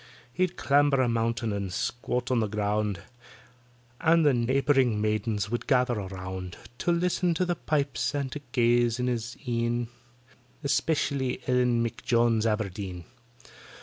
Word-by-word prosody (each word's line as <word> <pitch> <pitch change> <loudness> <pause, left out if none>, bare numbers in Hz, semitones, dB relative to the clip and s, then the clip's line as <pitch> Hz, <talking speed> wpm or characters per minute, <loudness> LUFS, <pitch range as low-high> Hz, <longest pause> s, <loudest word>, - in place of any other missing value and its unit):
He'd 180 +2 0
clamber 145 -1 +3
a 130 - +3
mountain 115 -1 0
and 100 -2 -3
squat 125 +5 -2
on 125 - +3
the 110 - +1
ground, 105 -1 -1 1.0
And 165 0 +4
the 145 - +5
neighbouring 130 -1 +2
maidens 105 -1 -1
would 120 - -3
gather 125 -2 +3
around 95 -2 -6 0.2
To 175 - +1
list 175 +2 0
to 185 - +1
the 175 -1 0
pipes 140 -5 -1
and 140 -2 -2
to 150 - -5
gaze 120 -1 +2
in 125 - 0
his 120 -1 -3
een, 120 0 -1 0.7
Especially 140 -2 0
ELLEN 125 -2 +2
M'JONES 115 -1 +1
ABERDEEN. 100 -5 -3
120 Hz, 135 wpm, -27 LUFS, 110-135 Hz, 1.0 s, the